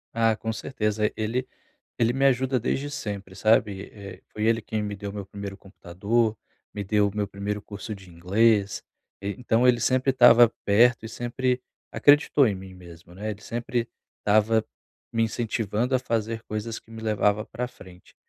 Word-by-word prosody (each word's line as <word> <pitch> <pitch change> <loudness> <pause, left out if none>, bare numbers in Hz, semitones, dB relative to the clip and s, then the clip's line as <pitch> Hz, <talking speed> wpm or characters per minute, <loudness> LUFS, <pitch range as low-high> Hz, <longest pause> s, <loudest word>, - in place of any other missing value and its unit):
Ah, 115 -1 +3
com 110 +1 -4
certeza, 105 -4 -1
ele 115 +4 -1 0.5
ele 115 0 +3
me 135 +1 +1
ajuda 130 0 +3
desde 135 +4 -2
sempre, 100 -6 -6
sabe? 105 -2 +2
Eh, 100 -2 -10
foi 110 +1 -2
ele 115 0 +3
quem 110 0 -3
me 105 -1 -4
deu 100 0 -6
o - - -9
meu 100 -2 -5
primeiro 100 0 -7
computador, 105 +4 -1 0.4
me 105 - -3
deu 105 +1 +2
meu 105 -1 -1
primeiro 100 +1 -4
curso 105 +2 -7
de 95 -2 -14
inglês 100 +4 +2 0.4
e 100 0 -3
então 125 0 +2
ele 120 -1 +5
sempre 130 +3 +2
estava 120 -2 +7
perto 115 +3 +4
e 110 - -5
sempre 125 +2 -1 0.3
acreditou 145 -1 +5
em 100 - -1
mim 95 0 -9
mesmo, 85 -1 -14
não 100 - -12
é? 110 - -1
Ele 105 0 -8
sempre 120 0 -2 0.3
estava 110 +1 +3 0.5
me 115 - +1
incentivando 115 +1 -1
a 130 - +5
fazer 115 -2 -2
coisas 110 +2 -4
que 115 - -24
me 110 0 -9
levava 105 -1 +1
pra 125 +2 -5
frente, 90 -7 -16
110 Hz, 175 wpm, -25 LUFS, 100-120 Hz, 0.5 s, estava